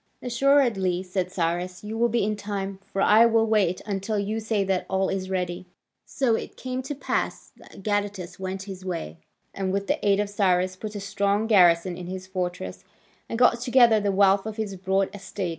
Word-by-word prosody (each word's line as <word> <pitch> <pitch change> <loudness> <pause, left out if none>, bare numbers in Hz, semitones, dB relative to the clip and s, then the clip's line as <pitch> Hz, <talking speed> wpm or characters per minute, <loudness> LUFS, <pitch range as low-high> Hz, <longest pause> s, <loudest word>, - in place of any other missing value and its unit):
"Assuredly," 235 -8 +2
said 185 -1 -3
Cyrus, 180 +1 -2
"you 215 +1 -5
will 235 +1 +2
be 235 -1 +1
in 210 +1 0
time: 200 -2 -4
for 195 - -1
I 225 +3 +6
will 225 -1 +3
wait 205 -5 +1
until 205 +1 -2
you 205 +2 -1
say 220 -2 0
that 190 -1 -1
all 190 0 +1
is 190 -1 -3
ready." 180 -1 -3 0.4
So 260 -5 +1
it - - -4
came 255 0 -4
to 270 +3 -5
pass - - -3
that 195 - -15
Gadatas 205 -3 -2
went 190 0 -4
his 190 -2 -8
way, 165 - -5 0.3
and 190 -1 -2
with 200 +1 -1
the - - -1
aid 200 -1 +3
of 210 - 0
Cyrus 185 -2 +1
put 210 +2 -7
a - - -3
strong 200 +1 0
garrison 180 -4 +4
in 180 - -7
his 185 0 -6
fortress, 180 - -4 0.5
and 230 - -3
got 240 -1 +4
together 240 -3 +5
the 205 -1 0
wealth 195 +1 +3
of 220 0 -6
his 210 -3 -3
broad 190 +1 0
estates. 195 -2 -5
195 Hz, 195 wpm, -25 LUFS, 185-215 Hz, 0.5 s, I